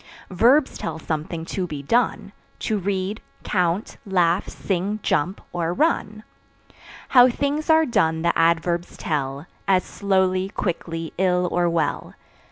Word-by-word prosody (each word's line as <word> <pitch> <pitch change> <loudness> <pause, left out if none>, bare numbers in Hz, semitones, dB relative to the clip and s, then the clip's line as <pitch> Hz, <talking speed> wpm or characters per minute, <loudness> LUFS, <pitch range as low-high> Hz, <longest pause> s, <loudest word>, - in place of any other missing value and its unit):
Verbs 255 - +3
tell - - -4
something 160 +1 -4
to 185 +1 -3
be 145 -4 -6
done 215 - 0 0.3
To 215 -2 0
read, 195 +2 -2 0.2
count, 180 +1 -1
laugh, 180 -2 +1
sing, 195 +3 -2
jump 180 +7 0
or 170 0 -1
run. 215 - 0 0.9
How 250 -1 +7
things 285 +5 -2
are 320 0 +5
done 165 - +1
the 170 - +2
Adverbs 170 +1 +1
tell 140 -2 -3 0.2
As 185 -2 +3
slowly, 190 -1 0
quickly, 165 -4 -4
ill 180 -1 +2
or 175 0 +2
well. 165 -3 -2
185 Hz, 130 wpm, -23 LUFS, 165-210 Hz, 0.9 s, How